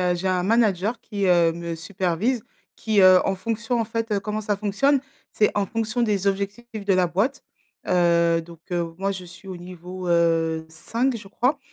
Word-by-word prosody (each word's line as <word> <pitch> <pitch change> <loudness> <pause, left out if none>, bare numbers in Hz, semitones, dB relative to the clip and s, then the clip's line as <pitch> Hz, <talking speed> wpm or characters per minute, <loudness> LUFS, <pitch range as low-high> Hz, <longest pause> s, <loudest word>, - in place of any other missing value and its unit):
heu, 180 -1 +2
j'ai 175 +2 -3
un 185 -1 +1
manager 215 +1 +2
qui, 200 -2 -2
heu, 170 -2 +4
me 170 0 -5
supervise, 190 +7 -1 0.3
qui, 215 -2 +1
heu, 185 0 +8
en - - +1
fonction, 230 +5 -2
en 230 - +1
fait 225 -2 -1
comment 210 +1 -3
ça 210 -1 -1
fonctionne? 215 +8 +2 0.3
C'est 210 - +3
en 205 -1 +1
fonction 225 +3 -2
des 205 -4 0
objectifs 200 +3 -3
de 195 - +4
la 185 -1 +3
boîte. 210 +11 -1 0.4
Heu, 170 -2 +3
donc 165 0 -13
heu, 170 -1 -2
moi, 195 +2 -1
je 185 -1 -7
suis 185 +3 -14
au 185 -2 -6
niveau, 180 +1 -8
heu, 165 -1 +2
5 235 +11 -1
je 205 -3 -11
crois, 255 +8 0
195 Hz, 190 wpm, -24 LUFS, 175-220 Hz, 0.4 s, heu